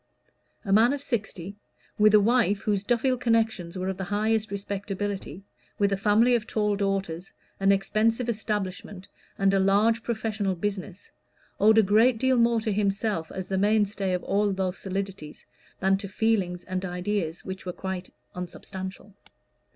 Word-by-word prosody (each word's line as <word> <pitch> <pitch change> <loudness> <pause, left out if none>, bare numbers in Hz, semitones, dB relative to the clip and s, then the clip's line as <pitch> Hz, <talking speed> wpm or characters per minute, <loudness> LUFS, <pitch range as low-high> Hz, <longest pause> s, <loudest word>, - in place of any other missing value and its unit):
A 195 - +1
man 230 +6 +5
of 285 - -4
sixty, 200 -6 -4 0.4
with 215 0 +6
a - - +8
wife 215 -2 +2
whose 205 -2 0
Duffield 250 +3 +1
connections 220 -7 0
were 185 0 -3
of 190 -1 -2
the 190 - -4
highest 215 +2 0
respectability, 200 -2 -4 0.3
with 200 -1 +2
a - - +3
family 215 +5 +3
of 235 -2 0
tall 210 -2 0
daughters, 195 -3 -2 0.3
an 195 0 +4
expensive 215 +5 +1
establishment, 205 -3 -3 0.3
and 195 0 +2
a 195 - +3
large 210 +4 +3
professional 215 -4 -2
business, 195 0 -5 0.5
owed 220 +2 +5
a 220 - +7
great 220 +5 +4
deal 260 +2 +2
more 235 0 +3
to 215 -2 -1
himself 200 -4 -1
as 190 -1 -5
the 190 -1 -1
mainstay 205 -1 +1
of 180 - -2
all 205 +1 +1
those 190 -1 -2
solidities, 195 -5 -5 0.3
than 195 0 +3
to 200 0 -7
feelings 195 -4 0
and 185 0 -4
ideas 180 -2 -3
which 190 -1 -7
were - - -1
quite 190 0 -6 0.2
unsubstantial. 190 +2 -7
200 Hz, 160 wpm, -26 LUFS, 190-220 Hz, 0.5 s, a